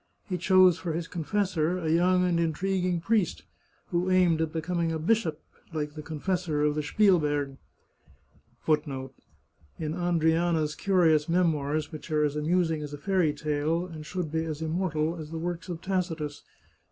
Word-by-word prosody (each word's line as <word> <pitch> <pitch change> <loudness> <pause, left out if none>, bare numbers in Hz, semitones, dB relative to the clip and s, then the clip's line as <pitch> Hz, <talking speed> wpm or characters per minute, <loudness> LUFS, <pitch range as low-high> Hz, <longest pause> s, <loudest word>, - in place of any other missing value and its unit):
He 180 -4 -2
chose 185 0 +5
for 170 -3 -3
his 165 +1 -3
confessor 180 -1 -1
a 170 -3 -3
young 180 +2 +3
and 175 -2 +1
intriguing 180 +1 0
priest, 210 -2 0 0.5
who 175 +2 0
aimed 180 -3 +4
at 160 -1 -1
be 165 - -2
coming 170 0 -1
a 160 - -1
bishop 165 -2 0 0.3
(like 150 -2 -3
the 155 - -7
confessor 160 0 -2
of 150 0 +2
the 150 - -1
Spielberg).* 145 -6 +2 1.1
♦ 145 -4 0 0.7
In 155 0 -3
Andryana's 165 -2 +1
curious 165 -5 +2
memoirs 155 -4 +1
which 155 +1 -9
are 155 -1 +2
as 150 -1 0
amusing 160 +1 +1
as 145 -1 -6
a - - -5
fairy 180 0 +1
tale 150 +3 -1
and 160 -4 -8
should 170 -1 -4
be 160 0 0
as 160 -1 -4
immortal 160 -1 -1
as 155 -2 -7
the 165 - -5
works 175 +2 -4
ot 170 -1 -5
Tacitus. 170 -6 -2
165 Hz, 165 wpm, -28 LUFS, 155-180 Hz, 1.1 s, chose